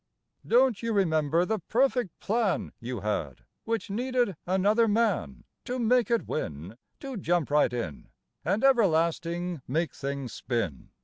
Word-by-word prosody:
Don't 245 Hz, -2 st, +4 dB
you 230 Hz, -1 st, -1 dB
remember 165 Hz, -3 st, +2 dB
the 220 Hz, +2 st, -1 dB
perfect 245 Hz, +1 st, 0 dB
plan 215 Hz, -3 st, 0 dB
You 120 Hz, -2 st, -5 dB
had, 85 Hz, -, -3 dB, 0.2 s
which 225 Hz, -3 st, -2 dB
needed 245 Hz, -2 st, 0 dB
another 205 Hz, +5 st, +3 dB
man 225 Hz, +2 st, 0 dB, 0.2 s
To 250 Hz, 0 st, -3 dB
make 245 Hz, 0 st, +2 dB
it 235 Hz, -1 st, +1 dB
win, 85 Hz, -, -4 dB, 0.3 s
To 270 Hz, -4 st, -5 dB
jump 175 Hz, -5 st, 0 dB
right 150 Hz, -4 st, +4 dB
in 115 Hz, -, -5 dB, 0.3 s
And 215 Hz, -, 0 dB
everlasting 170 Hz, -, +2 dB
make 160 Hz, +6 st, -1 dB
things 140 Hz, -3 st, -4 dB
spin? 105 Hz, -, -3 dB
180 Hz, 135 wpm, -28 LUFS, 140-230 Hz, 0.3 s, Don't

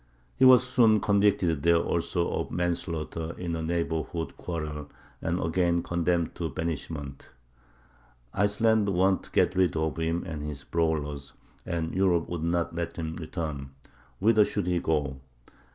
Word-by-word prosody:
He -, -, +4 dB
was 125 Hz, -1 st, +7 dB
soon 115 Hz, -4 st, +4 dB
convicted 100 Hz, -7 st, +2 dB
there 85 Hz, +2 st, +4 dB
also 85 Hz, +1 st, 0 dB
of -, -, -2 dB
manslaughter 85 Hz, -2 st, -3 dB
in 85 Hz, -2 st, -3 dB
a 80 Hz, -, -3 dB
neighborhood 80 Hz, 0 st, -2 dB
quarrel, 75 Hz, -4 st, -5 dB, 0.3 s
and 85 Hz, +2 st, -1 dB
again 85 Hz, +1 st, +1 dB
condemned 85 Hz, -1 st, 0 dB
to 85 Hz, -2 st, -3 dB
banishment. 75 Hz, -4 st, -5 dB, 1.1 s
Iceland 105 Hz, +1 st, +2 dB
wanted 95 Hz, 0 st, +2 dB
to -, -, -15 dB
get -, -, +3 dB
rid 90 Hz, -3 st, +2 dB
of 80 Hz, 0 st, -1 dB
him 80 Hz, +1 st, -1 dB
and 80 Hz, -4 st, -5 dB
his 75 Hz, -2 st, -5 dB
brawlers, 75 Hz, -4 st, -2 dB, 0.3 s
and 80 Hz, -1 st, -2 dB
Europe 90 Hz, -3 st, +2 dB
would 85 Hz, -2 st, -3 dB
not 85 Hz, 0 st, 0 dB
let 85 Hz, 0 st, -3 dB
him 80 Hz, -1 st, -4 dB
return. 75 Hz, -5 st, -5 dB, 0.4 s
Whither 110 Hz, +1 st, +5 dB
should 105 Hz, -2 st, -2 dB
he 90 Hz, -1 st, +1 dB
go? 75 Hz, -5 st, -1 dB
85 Hz, 145 wpm, -28 LUFS, 80-90 Hz, 1.1 s, was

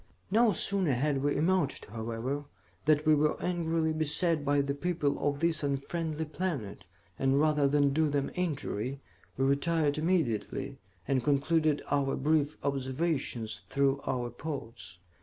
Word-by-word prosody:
"No 225 Hz, +2 st, +5 dB
sooner 190 Hz, -3 st, +1 dB
had 135 Hz, +2 st, 0 dB
we 145 Hz, +1 st, +1 dB
emerged, 165 Hz, -1 st, +1 dB
however, 115 Hz, +6 st, -4 dB, 0.4 s
than 150 Hz, -1 st, +4 dB
we 155 Hz, -, +6 dB
were 150 Hz, 0 st, +2 dB
angrily 165 Hz, -2 st, 0 dB
beset 155 Hz, +1 st, +1 dB
by 145 Hz, 0 st, +2 dB
the 140 Hz, 0 st, -1 dB
people 150 Hz, -1 st, -1 dB
of 145 Hz, 0 st, -1 dB
this 165 Hz, -2 st, +2 dB
unfriendly 155 Hz, +3 st, -2 dB
planet, 145 Hz, -, -4 dB, 0.3 s
and 135 Hz, +1 st, +3 dB
rather 150 Hz, -2 st, +3 dB
than 140 Hz, 0 st, +3 dB
do 155 Hz, +1 st, +2 dB
them 140 Hz, -1 st, -1 dB
injury, 140 Hz, -, -2 dB, 0.4 s
we 135 Hz, -, +2 dB
retired 145 Hz, +1 st, +1 dB
immediately, 140 Hz, -, -1 dB, 0.3 s
and 135 Hz, -3 st, +1 dB
concluded 150 Hz, +1 st, +2 dB
our 140 Hz, -1 st, +1 dB
brief 150 Hz, +1 st, +1 dB
observations 130 Hz, -5 st, -1 dB
through 140 Hz, 0 st, +1 dB
our 120 Hz, -2 st, -2 dB
ports. 115 Hz, -, -7 dB
145 Hz, 140 wpm, -30 LUFS, 135-160 Hz, 0.4 s, we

